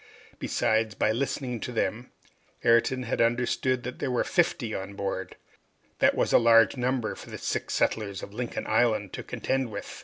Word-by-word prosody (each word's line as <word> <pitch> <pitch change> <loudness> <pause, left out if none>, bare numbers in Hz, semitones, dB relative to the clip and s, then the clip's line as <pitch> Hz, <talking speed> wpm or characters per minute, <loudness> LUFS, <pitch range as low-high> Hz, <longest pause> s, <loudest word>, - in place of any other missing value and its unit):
Besides, 110 -1 0
by 110 - +2
listening 125 0 -2
to 125 - -5
them, 120 +1 -2 0.5
Ayrton 115 +2 +3
had 120 - -1
understood 125 +2 +1
that 125 +1 -6
there 140 - -1
were 125 - +1
fifty 145 - 0
on 95 +1 -5
board. 100 -1 -4 0.6
That - - +4
was - - +1
a - - +8
large 115 0 +5
number 125 -2 -1
for - - -11
the - - -6
six - - -2
settlers 100 -3 0
of 100 - -8
Lincoln 120 +1 -4
Island 110 -5 +1
to - - -4
contend 130 -2 -2
with! 100 -1 -7
115 Hz, 175 wpm, -27 LUFS, 110-125 Hz, 0.6 s, a